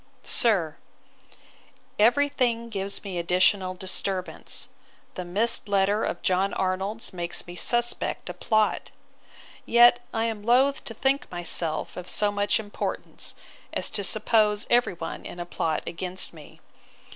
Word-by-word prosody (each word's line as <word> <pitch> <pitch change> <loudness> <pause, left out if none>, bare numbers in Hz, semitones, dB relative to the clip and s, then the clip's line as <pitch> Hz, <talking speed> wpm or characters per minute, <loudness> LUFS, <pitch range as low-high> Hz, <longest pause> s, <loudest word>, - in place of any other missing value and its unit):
'SIR, 180 -10 +1 1.2
'Every 245 +7 +5
thing 235 -4 -1
gives 200 -2 -4
me 190 -4 -4
additional 185 +2 +2
disturbance. 185 -2 -2 0.5
The 180 - -5
missed 205 +5 +1
letter 200 +1 +2
of 175 - -4
John 190 +2 +1
Arnold's 190 +5 -1
makes 175 -1 -2
me 175 - -9
suspect 240 +5 0
a - - -4
plot. 215 -2 0 0.7
Yet 240 +1 +6
am - - -2 0.2
I - - -14
loath 255 +5 +3
to 225 - -7
think 270 +4 0
myself 170 -2 0
of 180 0 -6
so 210 -1 +1
much 205 +1 +1
importance, 205 -2 -4 0.4
as - - -1
to 205 -2 -2
suppose 210 +1 +2
every 240 -4 +3
one 165 -1 -6
in 175 - -9
a 175 - -4
plot 160 -2 -2
against 180 +1 -3
me. 155 -3 -15
200 Hz, 135 wpm, -26 LUFS, 180-225 Hz, 1.2 s, Yet